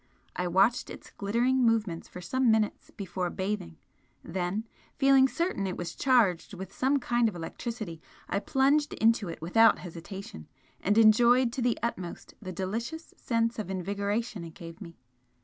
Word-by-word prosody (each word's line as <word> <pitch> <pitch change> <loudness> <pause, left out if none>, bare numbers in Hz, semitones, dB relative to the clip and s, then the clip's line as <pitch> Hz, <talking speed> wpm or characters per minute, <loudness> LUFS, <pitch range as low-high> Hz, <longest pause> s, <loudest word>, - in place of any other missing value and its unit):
I 180 - -1
watched 195 +7 +3
its - - -10
glittering 240 +6 +1
movement 220 -8 +1
for 180 - -9
some 255 +7 +1
minutes 220 -1 +1
before 185 -2 -4
bathing 190 - -4 0.5
then, 185 +5 -3 0.3
feeling 270 -1 +6
certain 255 - -1
it 185 - -4
was 175 -1 -5
charged 225 -7 +2
with 190 +1 -8
some 270 +2 +2
kind 240 -3 +1
of 205 - -10
electricity, 175 0 -6 0.3
I 200 - 0
plunged 280 +6 +2
into 225 -4 +2
it 165 -1 -7
without 225 +7 +5
hesitation 175 - -9 0.3
and 205 +3 +1
enjoyed 235 +2 +5
to 260 - -3
the 240 -1 +1
utmost 185 -7 -4
the 185 -3 -6
delicious 225 - -4
sense 230 -1 -1
of 210 - -4
invigoration 200 +2 -2
it 165 -1 -10
gave 165 +1 -10
me. 170 -3 -10
210 Hz, 155 wpm, -29 LUFS, 180-240 Hz, 0.5 s, feeling